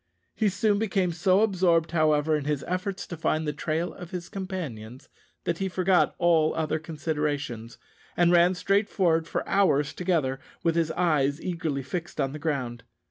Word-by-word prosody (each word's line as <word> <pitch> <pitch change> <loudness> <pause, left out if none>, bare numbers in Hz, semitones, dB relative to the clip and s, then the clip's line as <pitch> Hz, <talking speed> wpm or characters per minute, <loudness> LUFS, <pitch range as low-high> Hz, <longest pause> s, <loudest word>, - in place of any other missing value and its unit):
He 215 - +1
soon 205 +1 +1
became 195 -4 +1
so 185 +4 +3
absorbed, 175 -6 +2
however, 155 -1 +2
in 150 -2 -2
his 145 -2 -1
efforts 190 +2 -3
to 175 - -7
find 155 -1 -1
the 150 - -1
trail 160 +3 -2
of 175 - -10
his 175 -1 -6
companions, 150 - -6 0.3
that 170 -1 -2
he 190 0 -1
forgot 185 0 +2
all 165 -3 +3
other 160 0 -1
considerations, 150 -7 -3 0.4
and 175 0 +4
ran 175 +1 +5
straight 200 +3 +1
forward 165 -4 +1
for - - -3
hours 150 -8 +2
together 155 -8 0 0.2
with 165 - +2
his 165 -1 +1
eyes 150 -5 +1
eagerly 165 -7 -3
fixed 175 +3 -5
on 135 - 0
the 150 - -7
ground. 130 -7 -2
165 Hz, 170 wpm, -26 LUFS, 150-180 Hz, 0.4 s, ran